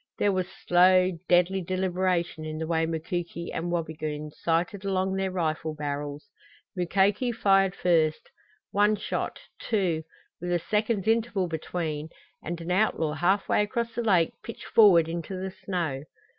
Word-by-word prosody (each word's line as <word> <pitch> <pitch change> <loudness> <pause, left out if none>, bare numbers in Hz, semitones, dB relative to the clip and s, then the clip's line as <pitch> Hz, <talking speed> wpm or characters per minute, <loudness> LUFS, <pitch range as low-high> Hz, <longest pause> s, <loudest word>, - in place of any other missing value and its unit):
There 205 - +2
was 185 -2 -1 0.2
slow 185 +1 +5 0.2
deadly 180 +2 +3
deliberation 185 -2 -1
in 155 0 -5
the 160 - -3
way 160 0 +1
Mukoki 170 +1 -4
and 170 +1 -3
Wabigoon 155 -3 -3
sighted 170 +6 -1
along 190 -1 0
their 190 0 -1
rifle 160 -3 -2
barrels. 145 +1 -4 0.5
Mukoki 195 +7 +2
fired 195 -4 +3
first; 160 -3 +1 0.4
one 205 +1 +3
shot, 210 - -3 0.2
two 185 -8 0 0.4
with 175 +1 -4
a 175 - +3
second's 210 +3 -1
interval 225 -4 +1
between 160 -2 -4 0.3
and 170 +1 -5
an 170 +2 -4
outlaw 180 -5 +1
half 180 +6 +1
way - - +3
across 230 +3 -2
the 240 - -2
lake 185 -8 +3
pitched 230 - -9
forward 185 -7 +6
into 170 +3 -4
the 190 0 -4
snow. 170 -8 -3
180 Hz, 145 wpm, -27 LUFS, 160-195 Hz, 0.5 s, forward